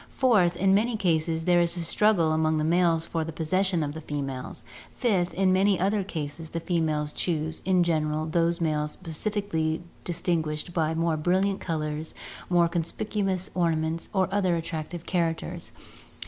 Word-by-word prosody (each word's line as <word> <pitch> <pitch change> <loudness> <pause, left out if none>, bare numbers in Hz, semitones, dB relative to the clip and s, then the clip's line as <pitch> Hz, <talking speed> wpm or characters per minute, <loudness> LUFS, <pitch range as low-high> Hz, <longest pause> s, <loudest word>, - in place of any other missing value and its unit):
Fourth, 205 -10 +3
in 190 +1 +3
many 220 +3 +2
cases 165 -3 0
there 175 -1 +4
is 170 +1 +1
a - - -2
struggle 170 -1 +2
among 155 0 +2
the 155 - 0
males 165 0 +2
for 165 -1 -2
the 165 - -5
possession 175 +2 +1
of 145 -1 -3
the 160 - -7
females. 135 -5 -5 0.3
Fifth, 190 -8 +1
in 185 0 +3
many 195 0 +3
other 200 +2 +1
cases 160 -3 -5
the 165 - -3
females 155 -3 -1
choose, 160 -2 -2
in 185 -1 +4
general, 155 -2 0
those 170 +1 +1
males 150 -2 0
specially 165 -2 -2 0.2
distinguished 165 -2 -2
by 160 -1 0
more 165 -1 +1
brilliant 190 +5 +1
colours, 155 -2 -3 0.3
more 175 -1 +4
con 170 0 0
spicuous 190 +2 -2
ornaments, 165 -2 0
or 190 -2 +2
other 185 -4 +2
attractive 165 0 -5
characters. 165 -3 -2
170 Hz, 160 wpm, -27 LUFS, 155-185 Hz, 0.3 s, there